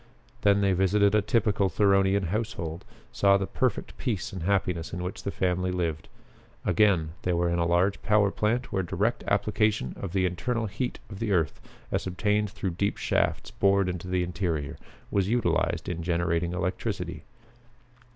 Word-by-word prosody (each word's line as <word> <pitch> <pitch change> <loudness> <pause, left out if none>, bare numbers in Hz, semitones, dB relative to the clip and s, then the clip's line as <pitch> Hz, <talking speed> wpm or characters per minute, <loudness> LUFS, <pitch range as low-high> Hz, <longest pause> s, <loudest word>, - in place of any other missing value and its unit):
Then 100 0 +4
they 100 -1 +3
visited 100 +2 +3
a 105 - +4
typical 105 -2 +1
Theronian 95 0 +3
household, 90 -5 -3 0.3
saw 100 -5 +4
the 95 - -1
perfect 130 +5 -1
peace 110 -9 -2
and 95 - -5
happiness 90 -2 0
in 90 - -3
which 90 +1 -5
the - - -3
family 90 -1 0
lived. 85 -4 -2 0.6
Again 95 -7 +3
they 90 - 0
were 85 0 +1
in 85 - 0
a 85 - +2
large 90 +3 +2
power 105 -2 +3
plant 120 +5 -1
where 95 - +1
direct 95 +6 -1
application 105 - +1
of 100 - -4
the 95 -1 +2
internal 110 +7 -1
heat 115 +5 -3
of 95 - -7
the 115 -3 -1
earth 85 -5 +1 0.3
as - - -1
obtained 105 +3 0
through 100 -2 -3
deep 100 +4 -1
shafts - - 0
bored 100 -1 +3
into 90 -1 -4
the 90 -1 +1
interior 85 -5 -2 0.4
was 100 -1 +1
utilized 120 +1 +1
in 85 -1 -3
generating 85 0 0
electricity. 90 0 -3
95 Hz, 165 wpm, -27 LUFS, 90-105 Hz, 0.6 s, Then